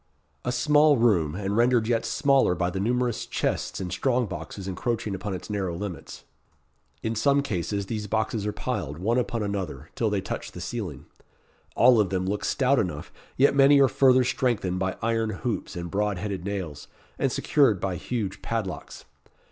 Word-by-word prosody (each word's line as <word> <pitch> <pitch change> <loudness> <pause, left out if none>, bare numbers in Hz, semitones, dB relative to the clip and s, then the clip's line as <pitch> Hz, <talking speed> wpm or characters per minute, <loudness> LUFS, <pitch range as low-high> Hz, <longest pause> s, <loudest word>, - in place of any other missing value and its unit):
A 125 - -1
small 150 +3 +4
room, 90 -10 +2
and 100 +1 -2
rendered 120 -1 +3
yet 115 -1 +1
smaller 140 -9 +3
by 90 0 -1
the 95 - -3
numerous 120 +3 0
chests - - -2
and 90 -2 -4
strong 125 +3 +1
boxes 95 0 -7
encroaching 105 +3 -2
upon 95 +1 -4
its 90 - -8
narrow 95 -5 -2
limits. 100 -3 -7 0.8
In 110 - -1
some 140 +5 +2
cases 100 -3 -2
these 105 0 -4
boxes 110 0 -1
are - - 0
piled, 105 - -4
one 115 +8 +1
upon 115 -2 -2
another, 100 -4 -4
till - - 0
they - - 0
touch - - -5
the - - -8
ceiling. 90 - -5 0.7
All 120 -1 +6
of 100 -3 +2
them 95 -1 -1
look 100 +2 -2
stout 135 0 +2
enough, 80 -7 -3 0.2
yet 140 +2 +5
many 140 +1 +6
are 135 - +6
further 130 -1 +4
strengthened 120 -7 0
by 95 0 -2
iron 115 -1 +1
hoops 110 -2 -3
and 85 -1 -5
broad 105 -1 0
headed 95 -1 -4
nails, 90 -8 -5 0.3
and - - +1
secured 130 -10 +3
by 95 -1 -2
huge 105 -1 -4
padlocks. 100 -9 -4
105 Hz, 175 wpm, -26 LUFS, 95-125 Hz, 0.8 s, All